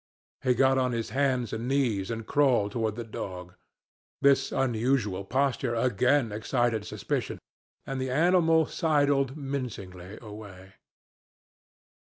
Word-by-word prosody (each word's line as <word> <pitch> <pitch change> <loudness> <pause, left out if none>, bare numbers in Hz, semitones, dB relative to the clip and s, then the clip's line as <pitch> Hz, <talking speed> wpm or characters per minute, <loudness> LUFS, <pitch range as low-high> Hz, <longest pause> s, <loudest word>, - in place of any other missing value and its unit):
He 125 -1 +2
got 130 +1 +3
on 125 -1 0
his 115 -1 -3
hands 130 -4 0
and 115 +2 -3
knees 120 -8 0
and 115 -1 -4
crawled 125 -7 +2
toward 110 -1 -1
the 120 - -5
dog. 90 -5 -7 0.7
This 135 -1 +3
unusual 115 -5 0
posture 130 +1 0
again 125 +2 +2
excited 110 0 -1
suspicion, - - -3 0.5
and 135 -1 -4
the 130 - -2
animal 165 +2 +3
sidled 145 -4 +1
mincingly 105 -10 -6
away. 100 -4 -11
125 Hz, 120 wpm, -28 LUFS, 110-135 Hz, 0.7 s, got